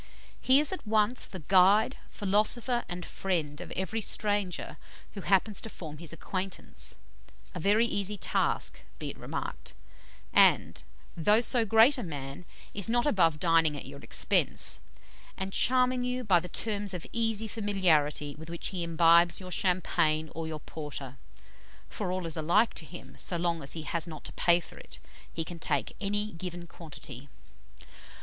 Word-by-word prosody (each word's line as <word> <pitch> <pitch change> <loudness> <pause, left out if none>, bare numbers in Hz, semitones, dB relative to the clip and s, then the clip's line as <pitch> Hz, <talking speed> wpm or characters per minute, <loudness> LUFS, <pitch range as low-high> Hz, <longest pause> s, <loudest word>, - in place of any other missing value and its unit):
He 260 +2 +6
is 300 - +1
at 370 - -7
once 215 +3 +2
the 185 - -8
"guide, 200 +6 +5
philosopher, 220 +5 0
and 175 -1 -5
friend" 165 -6 -2
of - - -8
every 205 +4 -2
stranger 205 -3 -2 0.4
who 200 - -6
happens 195 +2 +2
to 225 - -7
form 155 -7 -9
his 170 -2 -3
acquaintance 185 +3 -3 0.6
a 180 - -5
very 205 +6 +4
easy 205 -2 -1
task, - - 0 0.2
be - - -5
it - - -14
remarked - - -6 0.6
and, - - +4 0.3
though 210 +7 +4
so 240 -1 +2
great 225 +6 +5
a - - -3
man, 140 -1 -7 0.3
is 200 +1 -1
not 240 +1 +2
above 165 - +3
dining 165 -3 +3
at - - -7
your - - -9
expense, - - +3 0.6
and 190 0 -4
charming 255 0 +3
you 250 0 -2
by 190 -6 +4
the 180 +1 -8
terms 205 -2 -3
of 175 - -6
easy 225 -1 0
familiarity 170 -9 +1
with 160 +2 -11
which 170 0 -2
he 185 -3 -4
imbibes 170 +1 +4
your 185 -1 -9
champagne 170 -4 +1
or 165 0 -5
your 155 -2 -6
porter, 140 -4 -7 0.7
for 195 -4 -4
all 185 -1 -3
is 165 - -2
alike 175 +8 +2
to 160 - -4
him, 175 - -11
so 175 - -1
long 170 -1 -1
as 140 - -4
he 160 - -5
has 170 +1 -2
not 155 -3 -9
to - - -8
pay 170 0 +3
for 170 - -12
it: - - -9 0.3
he 165 - -3
can 170 0 -8
take 145 -6 0
any 205 +1 -1
given 175 -1 -7
quantity. 145 -5 -10
180 Hz, 165 wpm, -29 LUFS, 165-210 Hz, 0.7 s, He